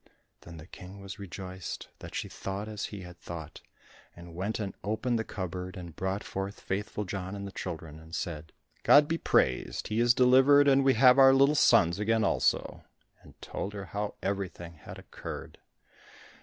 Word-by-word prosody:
Then 85 -1 -12
the 75 - -11
King 95 +3 -11
was 95 0 -9
rejoiced 95 -1 -7
that - - -9
she - - -2
thought 100 +2 -5
as 105 -2 -4
he 100 -2 -8
had 90 -1 -11
thought, 80 -2 -8 0.5
and 85 -1 -12
went 95 +6 -3
and 100 -3 -3
opened 115 +3 -1
the - - -1
cupboard, 95 -2 -5
and 85 -3 -9
brought 95 +2 -2
forth 95 +1 -5
Faithful 105 +2 -3
John 95 +1 -5
and 100 0 -6
the 100 - -7
children, 80 -5 -6
and 80 +1 -9
said, 80 -2 -5 0.3
"God 145 0 +6
be 165 +1 -1
praised, - - +1
he 110 +1 0
is 120 0 +4
delivered, 135 +3 +6
and 135 0 +5
we 135 -1 +4
have 125 +3 +6
our 135 0 +8
little 140 +2 +5
sons 85 - +4
again 110 +1 +2
also," - - 0 0.4
and - - -18
told 100 - -5
her 100 -1 -6
how 105 +2 -4
everything 95 -3 -3
had 75 - -11
occurred. - - -9
100 Hz, 180 wpm, -29 LUFS, 90-110 Hz, 0.5 s, our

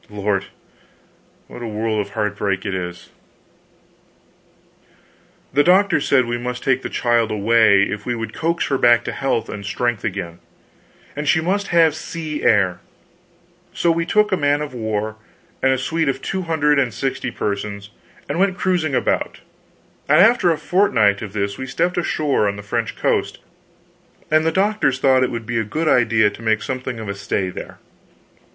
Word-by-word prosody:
Lord, 105 -1 -1 1.0
what - - -10
a 120 - -4
world 110 0 -2
of 105 - -4
heart 105 -1 -1
break 100 -1 -2
it 100 - -2
is. 90 -1 -6 2.4
The 145 +2 +4
doctors 190 +3 +3
said 130 -3 +4
we 120 0 -3
must 125 0 -5
take 130 -1 +1
the - - -5
child 120 -2 +1
away, 105 -1 +4
if 105 +1 -3
we 120 +1 -2
would 115 -1 -5
coax 170 +1 -1
her 135 -2 0
back 120 0 +5
to - - -4
health 135 -5 -1
and 100 - -7
strength 120 +3 -2
again. 90 -5 -4 0.8
And 150 +1 -4
she 160 - +4
must 195 +5 -1
have 165 -2 +4
sea 155 -1 -5
air. 95 -5 +2 0.9
So 170 - +2
we 165 0 -1
took 210 +2 +2
a 190 - +2
man 145 -1 +1
of 145 - -7
war, 110 -2 -3 0.4
and 130 - +3
a 130 - +2
suite 160 +3 -1
of 135 0 -2
two 190 +7 -3
hundred 150 -3 +2
and 130 -4 +1
sixty 130 +3 -3
persons, 100 -2 -4 0.4
and - - -3
went 190 -1 +2
cruising 175 -7 0
about, - - -1 0.7
and 150 +3 +6
after 220 -1 +5
a 165 - +1
fortnight 130 - +2
of 105 -3 -7
this 100 -1 -2
we 130 - -5
stepped 175 +7 0
ashore 150 -9 0
on 100 - -1
the 100 - -9
French 100 - -3
coast, - - 0 0.9
and 155 +1 +3
the - - +2
doctors 195 -7 +1
thought 130 -1 +3
it 130 - +2
would 115 -2 -5
be 120 +1 -1
a - - 0
good 155 +10 -3
idea 110 -5 +3
to 105 - -12
make 110 -1 0
something 130 -2 -4
of 110 - -6
a 100 - -2
stay 100 -1 -2
there. - - -9
125 Hz, 180 wpm, -20 LUFS, 105-155 Hz, 2.4 s, and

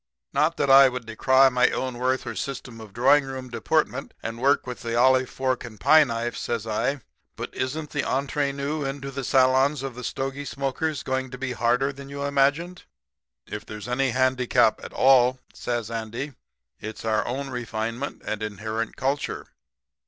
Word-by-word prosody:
Not 155 +4 +2
that 140 - +2
I 135 0 +9
would 125 -2 -6
decry 130 +4 +4
my 125 0 +3
own 130 -2 -3
worth 130 +1 0
or - - -4
system 125 -4 -5
of 110 -2 -11
drawing 135 +6 +4
room 130 -2 -7
deportment, 115 -4 -1
and 115 +1 -5
work 140 +2 +3
with 125 -1 -6
the 115 0 -3
olive 130 +1 +4
fork 130 -1 -1
and 110 -4 -10
pie 155 +7 +7
knife,' 115 -1 -3
says 115 -2 -3
I, 125 +5 -1 0.3
'but - - -6
isn't 150 +4 -3
the 140 - -1
entree 140 +1 0
nous 140 +2 -3
into 135 0 -5
the 135 0 -5
salons 130 +2 +3
of 135 -2 -4
the 125 +1 -9
stogie 135 +3 -3
smokers 140 +2 -2
going 130 0 -2
to 125 - -8
be 130 0 -3
harder 125 +3 +1
than 140 0 -10
you 140 0 -5
imagined?' 145 +6 +1 0.6
"'If 105 - -6
there's 105 +1 -8
any 130 +2 +1
handicap 130 0 +2
at - - -7
all,' 130 -1 +5 0.2
says 120 -2 -3
Andy, 115 +5 -4 0.5
'it's 110 +1 -7
our 110 -1 +2
own 135 +3 -3
refinement 115 +2 -4
and 110 0 -3
inherent 110 +1 -3
culture. 140 +2 -2
130 Hz, 175 wpm, -25 LUFS, 120-140 Hz, 0.6 s, I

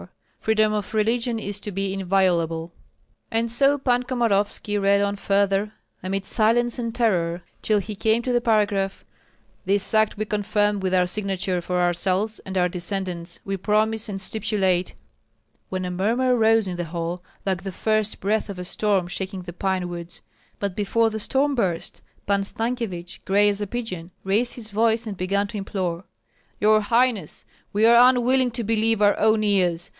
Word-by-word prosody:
Freedom 215 -1 +2
of 210 +1 -3
religion 230 +2 +1
is 205 -2 -4
to 205 - -2
be 195 0 -2
inviolable 175 -4 +1 0.3
" - - -42
And 230 0 -1
so 275 +4 +4
Pan 245 -3 +1
Komorovski 210 -4 0
read 200 0 +4
on 200 0 0
further, 200 +1 +1 0.3
amid 195 +1 -3
silence 235 +3 +2
and 230 -1 -3
terror, 175 -7 +1 0.2
till 215 - +2
he 210 +2 -3
came 220 +3 +1
to 250 - -1
the 240 - +2
paragraph: 205 -4 +1 0.6
"This 195 +2 +1
act 215 -1 +3
we 215 - -2
confirm 210 0 0
with 190 -1 0
our 180 -1 +4
signature 190 -1 -2
for 180 +1 -2
ourselves 185 +5 0
and 190 0 -6
our 180 -1 +3
descendants, 180 -1 -4
we 195 - -2
promise 215 +3 0
and 195 -1 -4
stipulate 190 -3 0 0.4
" - - -44
when 185 -1 -3
a 180 - -3
murmur 235 +8 +1
rose 225 -2 +3
in 180 -1 -4
the 175 - -2
hall, 170 +1 -4 0.2
like 190 -2 -1
the 195 - -5
first 215 +2 0
breath 215 +2 0
of 200 - -6
a 180 - -6
storm 200 -1 0
shaking 190 +1 -5
the 175 - -8
pine 185 0 -1
woods. 175 0 -8 0.3
But 200 -2 -3
before 225 +2 +1
the 220 - -4
storm 275 +6 +1
burst, 185 -10 -2 0.2
Pan 200 0 +1
Stankyevich, 210 -5 -4
gray 205 +2 +4
as 205 0 -2
a 205 - -2
pigeon, 190 -7 -5
raised 215 +6 +1
his 220 -3 -7
voice 225 +2 +2
and 210 -3 -5
began 195 +2 0
to 215 - -5
implore, 185 -2 -3 0.5
"Your 215 +1 +4
highness, 230 -1 0 0.3
we 210 +2 +2
are 235 +2 +8
unwilling 255 0 +2
to 235 0 -2
believe 220 0 +1
our 205 0 +5
own 220 0 +3
ears! 180 -5 +1
205 Hz, 175 wpm, -23 LUFS, 185-220 Hz, 0.6 s, are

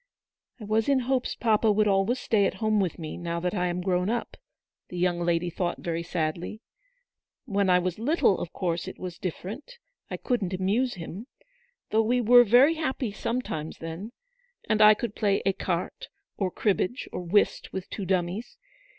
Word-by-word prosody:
"I - - -9
was 215 +4 +1
in 270 -2 +3
hopes 255 0 -1
papa 220 -1 +2
would 210 +1 +3
always 195 +5 +2
stay 215 -5 +2
at - - -4
home 215 -1 +1
with 185 -5 -1
me 155 -2 -6
now 170 -1 -3
that 180 +1 -2
I 180 -3 0
am 175 +1 -2
grown 180 0 +1
up," 235 0 -2 0.5
the 180 - -7
young 175 -1 +1
lady 175 0 0
thought 175 +1 -2
very 170 -1 -3
sadly. 170 +4 -3 0.5
" - - -66 0.3
When 200 -5 +1
I 180 - +6
was 180 -1 -1
WAITING. 225 - -5
95 320 +5 0
little, 190 - +5
of 165 - -5
course 170 -1 -2
it 190 - -7
was 180 -2 -7
different; 215 - -6 0.3
I - - -4
couldn't 205 -8 -1
amuse 215 +7 0
him. 180 +6 -8 0.6
Though 220 - +4
we 240 +3 +1
were 245 +1 +7
very 245 +8 +6
happy 270 -7 -2
some 235 +5 -2
times 155 -6 -5
then; 165 +7 -7 0.6
and 215 0 +2
I 215 0 +8
could 220 0 -4
play 200 -2 +1
ecarte, 195 - -2 0.3
or 190 -3 -1
cribbage, 205 +6 -1
or - - -3
whist 180 +4 +1
with 190 -1 -5
two 200 - -4
dummies. 185 +5 -2
195 Hz, 190 wpm, -27 LUFS, 180-230 Hz, 0.6 s, I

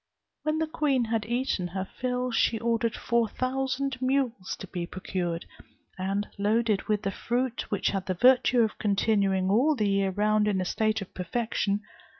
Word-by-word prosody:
When 310 0 0
the 320 - +1
queen 285 -5 +1
had 225 -1 -1
eaten 240 -6 0
her 190 +2 -4
fill, 250 +3 -2
she 230 0 +2
ordered 230 -1 0
four 235 -1 +1
thousand 265 +1 -2
mules 255 -7 0
to - - -8
be 175 -2 -5
procured, 175 -2 -3 0.5
and 195 +2 -2
loaded 215 0 +2
with 210 -1 0
the 195 - 0
fruit, 245 +4 -2
which 205 - +1
had 195 -2 -3
the 185 - 0
virtue 250 +3 +5
of 220 -2 0
continuing 195 -2 +2
all 270 +9 +4
the 215 -5 +1
year 195 -1 +2
round 210 +2 +2
in 200 -2 +1
a 185 - -1
state 215 +2 0
of 185 - -16
perfection. 205 +1 -1
215 Hz, 170 wpm, -28 LUFS, 195-250 Hz, 0.5 s, virtue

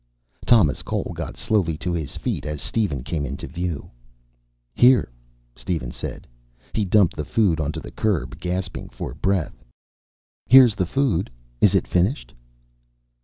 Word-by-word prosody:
Thomas 105 -12 +4
Cole - - -3
got - - -6
slowly 90 -8 0
to 90 +3 -3
his 80 -5 -4
feet - - -3
as 75 -1 -4
Steven 80 - -1
came 70 +3 -3
into 70 0 -5
view. 85 -4 -4 0.8
"Here," 125 - +5 0.4
Steven 60 0 -3
said. - - -7 0.5
He 105 - 0
dumped 95 -1 +3
the 75 - -3
food 90 -1 +1
onto 75 0 -2
the - - -9
curb, 85 -12 -1
gasping 90 0 -4
for - - -6
breath. 75 -5 -1 0.8
"Here's 130 -2 +8
the 95 -4 -1
food. 115 -6 0 0.3
Is 100 -1 +5
it 95 - +2
finished?" 95 +11 0
90 Hz, 140 wpm, -23 LUFS, 75-105 Hz, 0.8 s, Here's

